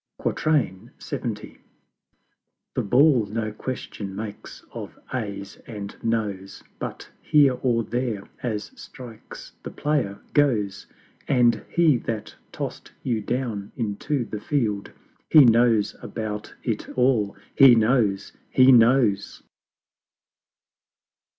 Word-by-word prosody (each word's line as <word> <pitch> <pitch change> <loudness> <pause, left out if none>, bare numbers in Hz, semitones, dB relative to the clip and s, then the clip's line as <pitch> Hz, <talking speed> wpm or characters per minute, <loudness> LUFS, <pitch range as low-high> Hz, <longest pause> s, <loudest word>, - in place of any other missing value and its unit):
LXX. 115 -4 -2 1.1
The - - 0
Ball 125 0 +4
no 110 +1 -3
question 105 -4 -6
makes 105 0 -8
of - - -8 0.2
Ayes 100 -5 -5
and 105 -3 -7
Noes, 105 -4 -2 0.2
But - - -7
Here 145 -3 +4
or 120 -3 +1
There 115 -3 -2 0.2
as 105 -4 -3
strikes 120 -4 -11
the - - -7
Player 135 -10 -1
goes; 105 -9 +1 0.4
And 120 -4 +3
He 160 -6 +4
that 115 -2 -5 0.2
toss'd - - -6
you 115 -4 -1
down 110 -3 -3
into 120 +4 -2
the 105 -1 -6
Field, 105 -9 -1 0.4
He 150 -4 +8
knows 115 -2 +4
about 105 -2 -5
it 110 -4 -3
all 120 -6 +2 0.2
HE 135 -3 +9
knows 110 -4 +1 0.2
HE 130 +1 +6
knows! 115 -4 +3
115 Hz, 105 wpm, -24 LUFS, 105-130 Hz, 1.1 s, HE